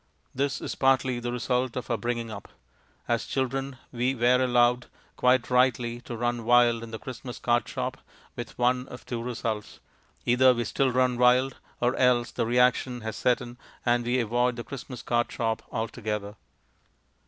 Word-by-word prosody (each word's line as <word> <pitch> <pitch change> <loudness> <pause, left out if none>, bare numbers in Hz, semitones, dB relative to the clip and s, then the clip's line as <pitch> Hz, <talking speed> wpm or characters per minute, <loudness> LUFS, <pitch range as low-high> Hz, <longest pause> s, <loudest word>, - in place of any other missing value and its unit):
This 140 +1 -1
is - - -4
partly 130 -2 +2
the 120 0 -3
result 125 0 -1
of 125 - -4
our - - +3
bringing 115 +1 -3
up; - - -8 0.6
as 120 -1 0
children 135 0 -2
we 125 +2 0
were 125 +1 +3
allowed 125 0 +3 0.3
(quite 125 0 +2
rightly) 120 -2 +2
to 120 - -5
run 120 0 -1
wild 120 0 +4
in 115 - -8
the 110 - -5
Christmas 125 -1 -8
card 120 0 +1
shop, - - -3 0.4
with 120 -1 -7
one 125 +1 +1
of 125 - -11
two 120 -2 -4
results. 115 -3 -4 0.5
Either 125 +1 +5
we 120 - -1
still 130 +4 +1
run 125 -1 +2
wild, 125 +1 +4 0.2
or 125 +1 +1
else 125 -2 +3
the - - -1
reaction 125 0 +2
has 110 -1 -5
set 125 -1 +2
in 120 0 -9 0.3
and 120 0 +2
we 120 +2 +1
avoid 120 +2 +1
the 120 - -5
Christmas 125 -2 -8
card 120 0 0
shop 115 -1 -1
altogether. 110 -3 -3
120 Hz, 170 wpm, -27 LUFS, 120-125 Hz, 0.6 s, Either